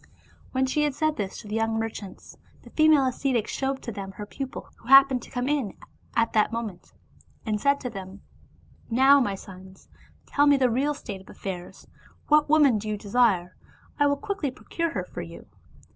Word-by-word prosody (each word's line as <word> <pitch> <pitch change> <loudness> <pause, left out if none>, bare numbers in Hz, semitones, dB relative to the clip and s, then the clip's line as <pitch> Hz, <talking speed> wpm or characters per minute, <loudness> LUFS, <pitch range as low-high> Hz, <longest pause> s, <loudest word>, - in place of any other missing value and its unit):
When 260 0 +1
she 265 +3 0
had 295 -3 0
said 310 0 0
this 195 -2 -4
to - - -13
the 210 - -6
young 225 0 0
merchants, 220 -4 -6 0.3
the - - -15
female 310 -3 +5
ascetic 255 -3 0
showed 270 0 -2
to 235 - -5
them 195 -2 -7
her 210 - -7
pupil 265 +5 -7
who - - -18
happened 270 -1 +7
to - - -12
come 245 0 -3
in 275 -9 -1 0.4
at 230 -1 +1
that 215 0 +3
moment, 220 -6 -6 0.5
and 210 -2 -1
said 280 0 +3
to 250 - -3
them, 195 -1 -9 0.3
" - - -31 0.2
Now, 265 +4 +6
my 205 -7 0
sons, 190 0 -13 0.4
tell 290 0 +2
me 285 -1 +6
the 255 -3 +2
real 285 +5 0
state 200 -8 -7
of 190 - -19
affairs 180 -2 -7 0.2
— - - -29
^what 300 0 +5
woman 290 -7 +5
do 215 +1 -5
you 210 - -2
de 200 -1 -11
sire? 195 -7 +2 0.4
I 290 - +5
will 285 0 +1
quickly 400 -5 -3
procure 335 +6 -3
her - - -2
for - - -7
you." - - -10
245 Hz, 205 wpm, -26 LUFS, 205-280 Hz, 0.5 s, happened